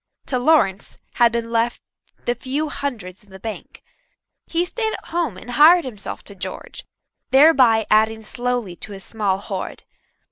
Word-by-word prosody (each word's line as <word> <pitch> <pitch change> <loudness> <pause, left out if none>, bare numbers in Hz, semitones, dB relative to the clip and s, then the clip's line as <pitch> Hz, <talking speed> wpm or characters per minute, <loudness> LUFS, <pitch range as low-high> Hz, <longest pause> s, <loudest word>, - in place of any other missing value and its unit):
To 255 - -1
Lawrence 245 -9 +2 0.2
had 235 -1 +4
been 230 0 -3
left 235 +1 0 0.5
the 240 - +1
few 270 +5 -3
hundreds 220 -12 -5
in 205 - -24
the 190 - -11
bank. 220 +2 -8 0.6
He 340 +1 0
stayed 440 +4 -2
at - - -8
home 330 - -1
and 245 +6 -9
hired 315 +6 +6
himself 215 -6 -7
to 200 - -12
George, 195 - -7 0.5
thereby 260 -6 +5
adding 220 +1 +3
slowly 240 -4 -3
to 220 -4 -9
his 195 -1 -9
small 205 -4 -1
hoard. 195 -1 -6
235 Hz, 155 wpm, -21 LUFS, 210-280 Hz, 0.6 s, hired